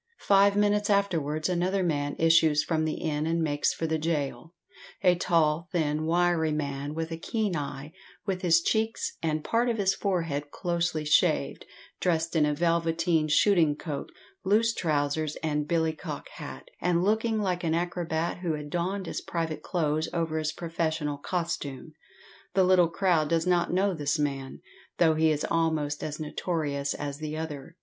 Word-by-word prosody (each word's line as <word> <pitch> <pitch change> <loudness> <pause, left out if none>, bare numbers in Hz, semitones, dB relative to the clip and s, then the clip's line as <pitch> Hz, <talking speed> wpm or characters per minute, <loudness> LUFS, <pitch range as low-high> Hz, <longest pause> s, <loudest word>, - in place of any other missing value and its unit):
Five 200 0 +5
minutes 205 0 +2
afterwards 165 -7 +1
another 185 +2 0
man 145 -4 -1
issues 160 -2 +4
from 160 -2 0
the 155 - -1
inn 155 -1 -2
and 165 +1 +1
makes 145 -3 +1
for 165 - -3
the 160 0 0
gaol 155 0 -3 0.5
a 180 -2 +6
tall, 165 -1 +1
thin, 155 -3 0
wiry 170 -2 +2
man, 145 -1 -3
with 165 0 -3
a 165 - -3
keen 210 0 -1
eye, 145 +1 -5 0.3
with 190 -3 -2
his 170 -2 +4
cheeks 220 +3 0
and 155 -2 -1
part 235 +2 +1
of 230 - 0
his 195 -2 +2
forehead 165 -7 -2
closely 170 -2 -1
shaved, 150 - +2 0.3
dressed 165 -1 0
in 150 -2 +4
a 150 - 0
velveteen 165 0 +1
shooting 160 -1 +4
coat, 145 -2 -6 0.3
loose 220 +4 +3
trousers, 150 -2 -1
and 150 -1 -1
billycock 160 - -2
hat, - - -9
and 175 -1 +2
looking 220 +2 +1
like 180 -4 -1
an 160 -1 +1
acrobat 170 -1 -2
who 175 -3 -1
had 150 -1 -7
donned 185 +3 -2
his - - -4
private 165 -2 -3
clothes 160 -3 -1
over 165 -2 -1
his 155 -1 -1
professional 160 -3 -2
costume. 155 -4 -4 0.6
The 190 - +5
little 180 -2 +5
crowd 170 -4 +1
does 165 0 +1
not 175 -1 +2
know 190 +2 +2
this 150 -2 -1
man, 140 -3 -3 0.4
though 160 -2 +4
he 160 0 +3
is 150 -1 0
almost 160 -3 0
as 150 0 -4
notorious 150 -3 -2
as 145 -1 -5
the 155 0 -4
other. 155 -1 -6
165 Hz, 165 wpm, -28 LUFS, 150-180 Hz, 0.6 s, a